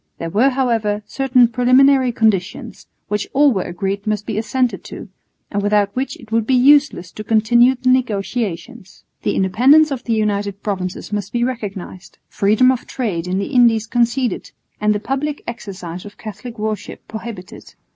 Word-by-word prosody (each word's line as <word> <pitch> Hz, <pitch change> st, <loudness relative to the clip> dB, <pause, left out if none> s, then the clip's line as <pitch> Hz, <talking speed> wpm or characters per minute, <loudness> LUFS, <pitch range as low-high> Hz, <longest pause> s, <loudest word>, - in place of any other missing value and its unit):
There 165 Hz, 0 st, -5 dB
were, 235 Hz, +9 st, +3 dB
however, 230 Hz, -6 st, 0 dB
certain 260 Hz, -2 st, +3 dB
preliminary 255 Hz, +2 st, +4 dB
conditions, 215 Hz, -5 st, -1 dB, 0.2 s
which 210 Hz, -1 st, -2 dB
all 280 Hz, -1 st, +4 dB
were 190 Hz, -, -1 dB
agreed 195 Hz, +4 st, -4 dB
must 210 Hz, -1 st, -1 dB
be 220 Hz, -, -4 dB
assented 245 Hz, +3 st, -1 dB
to, -, -, -9 dB, 0.4 s
and 205 Hz, -, -1 dB
without 205 Hz, 0 st, +1 dB
which 260 Hz, +2 st, -3 dB
it 225 Hz, -2 st, -16 dB
would 225 Hz, -1 st, 0 dB
be 265 Hz, -, +3 dB
useless 275 Hz, -, +4 dB
to 215 Hz, -, -8 dB
continue 235 Hz, +4 st, +4 dB
the 255 Hz, 0 st, -1 dB
negotiations. 225 Hz, -3 st, -2 dB, 0.2 s
The -, -, -1 dB
independence 265 Hz, +11 st, +4 dB
of 260 Hz, -2 st, -4 dB
the 230 Hz, -, -1 dB
United 205 Hz, -2 st, -1 dB
Provinces 190 Hz, -1 st, -4 dB
must 205 Hz, -1 st, -3 dB
be 240 Hz, 0 st, 0 dB
recognised, 195 Hz, -7 st, -6 dB
freedom 215 Hz, +6 st, +3 dB
of 255 Hz, -1 st, -4 dB
trade 185 Hz, -9 st, -3 dB
in 185 Hz, +1 st, -1 dB
the 200 Hz, +8 st, -3 dB
Indies 230 Hz, -3 st, +4 dB
conceded, 240 Hz, 0 st, -1 dB, 0.3 s
and 210 Hz, 0 st, +2 dB
the -, -, -1 dB
public 275 Hz, +6 st, -3 dB
exercise 185 Hz, -6 st, -7 dB
of 205 Hz, -1 st, -12 dB
Catholic 220 Hz, +2 st, -9 dB
worship 215 Hz, 0 st, -5 dB
prohibited. 220 Hz, -4 st, -9 dB
220 Hz, 165 wpm, -19 LUFS, 200-250 Hz, 0.4 s, preliminary